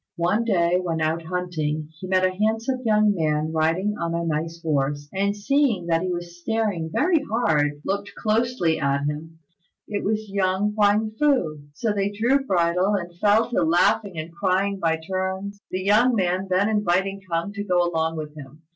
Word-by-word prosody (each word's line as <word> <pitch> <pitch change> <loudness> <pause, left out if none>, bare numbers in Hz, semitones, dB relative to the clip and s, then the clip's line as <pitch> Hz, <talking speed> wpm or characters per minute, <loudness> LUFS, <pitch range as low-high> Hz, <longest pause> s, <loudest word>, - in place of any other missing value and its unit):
One 190 +7 +1
day 180 -4 +2
when 165 -3 -2
out 160 +1 0
hunting 160 -4 -3
he 185 - -6
met 185 0 +3
a 185 - +2
handsome 225 +6 0
young 215 -2 +3
man 155 -3 0
riding 165 +6 +1
on 170 0 -2
a 170 0 -1
nice 165 +1 -2
horse, 145 -2 -1
and 200 +1 0
seeing 230 -4 +1
that 165 -1 +1
he 185 - -2
was 175 0 -6
staring 205 -7 -1
very 335 - +2
hard 150 - +1
looked 200 +1 -3
closely 220 -6 +1
at 140 0 0
him. 155 +2 -5 0.5
It 205 -1 -3
was 215 +1 -1
young 195 +1 0
Huang 210 +1 +2
fu. 250 - +2 0.2
So 220 +3 -1
they 200 -1 0
drew 240 +7 +1
bridle, 180 -2 +2
and 175 -3 -4
fell 215 +4 +3
to - - +1
laughing 185 +3 +2
and 160 +2 -6
crying 195 +3 0
by 160 -2 +1
turns, 190 +2 -3
the 185 0 -3
young 225 +5 +4
man 185 -1 0
then 185 +2 +2
inviting 195 -2 0
K'ung 170 +5 -1
to 205 -1 -4
go 180 -3 +2
along 160 -1 -1
with 150 -1 -6
him. 150 +2 -12
185 Hz, 180 wpm, -24 LUFS, 165-210 Hz, 0.5 s, young